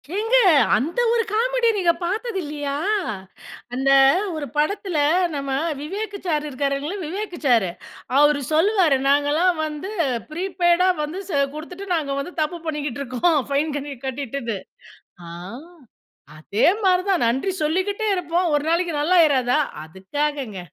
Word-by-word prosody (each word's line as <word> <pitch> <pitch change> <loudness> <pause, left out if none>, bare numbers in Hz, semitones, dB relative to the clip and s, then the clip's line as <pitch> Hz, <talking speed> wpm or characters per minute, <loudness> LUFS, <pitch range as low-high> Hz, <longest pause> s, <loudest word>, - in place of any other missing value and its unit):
ஏங்க 450 +4 +1 0.4
அந்த 300 - -1
ஒரு 460 -1 +2
காமெடி 480 +1 +2
நீங்க 350 -3 +3
பாத்தது 420 +4 -2
இல்லையா? 290 -2 -4 1.0
அந்த 270 +2 0 0.5
ஒரு 300 - -4
படத்துல 355 +2 0 0.4
நம்ம 275 -1 -3 0.3
விவேக்கு 400 +6 -5
சாரு 305 -3 0
இருக்காருலங்க, 280 +6 -2
விவேக்கு 370 +1 -5
சாரு. 225 -8 +3 0.5
அவரு 295 -1 +4
சொல்லுவாரு 345 -3 +3
நாங்கலாம் 295 +6 +3
வந்து 305 +5 -6 0.4
ப்ரீபெய்டா 355 +1 +1 0.2
வந்து 330 +6 -5
ச - - -4 0.2
குடுத்துட்டு 360 +6 -8
நாங்க 290 -4 -2
வந்து 345 +6 -6
தப்பு 310 +3 -2
பண்ணிக்கிட்டு 290 -3 -3
இருக்கோம். 280 +5 +1
பைன் 295 +2 0
கன்னி 285 0 -6
கட்டிட்டுது. 265 -4 -4 0.7
ஆ. - - -9 1.1
அதே 200 +7 +1 0.2
மாரிதான் 365 -3 +2
நன்றி 265 +11 0
சொல்லிக்கிட்டே 375 +7 0
இருப்போம். 345 0 0
ஒரு 295 - +2
நாளைக்கு 340 0 0
நல்லா 350 +5 +3
ஆயிறாதா. 260 -3 +2 0.3
அதுக்காகங்க. 220 - -4
310 Hz, 125 wpm, -22 LUFS, 280-370 Hz, 1.1 s, அவரு